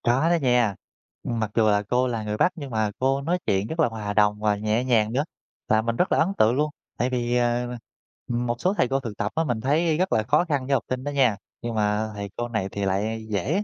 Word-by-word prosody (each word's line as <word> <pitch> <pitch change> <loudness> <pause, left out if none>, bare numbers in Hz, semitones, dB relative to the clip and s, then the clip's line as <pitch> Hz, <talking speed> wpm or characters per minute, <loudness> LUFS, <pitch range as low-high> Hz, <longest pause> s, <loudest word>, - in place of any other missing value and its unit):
Có 130 +7 +3
đó 175 - +4
nha. 125 -6 +3 0.5
Mặc 110 -3 -2
dù 110 -2 +4
là 105 -1 +3
cô 125 +1 +2
là 115 -3 -2
người 105 0 -3
Bắc 180 - +3
nhưng 145 -4 -7
mà 110 -2 0
cô 135 +1 +1
nói 170 +5 0
chuyện 95 +1 +1
rất 160 +7 -6
là 160 - +5
hòa 110 -3 -4
đồng 105 0 +3
và 105 -1 +2
nhẹ 110 +3 0
nhàng 115 -4 +2
nữa, 140 +3 +2 0.4
và 110 - +3
mình 115 +1 -1
rất 180 - +1
là - - +3
ấn 160 - +4
tượng 110 +3 +4
luôn. 150 +2 +1 0.3
Tại 125 - +1
vì, 120 -1 -1
à, 120 0 +1 0.6
m 120 0 -1
một 120 - 0
số 185 - +2
thầy 165 - +2
cô 135 +2 0
thực 115 -6 -7
tập 105 - -1
á, 160 - +2
mình 120 -7 -2
thấy 155 +5 +2
rất 185 +2 +1
là 110 - +2
khó 170 - +2
khăn 145 -6 -1
với 140 - 0
học 135 - +2
sinh 130 0 -2
đó 145 - -3
nha, 130 -7 +3 0.2
nhưng 120 -1 -4
mà 105 0 +1
thầy 100 0 -5
cô 120 - -2
này 110 -5 -2
thì 100 -1 -2
lại 110 +4 -1
dễ 120 - 0
120 Hz, 265 wpm, -25 LUFS, 110-135 Hz, 0.6 s, là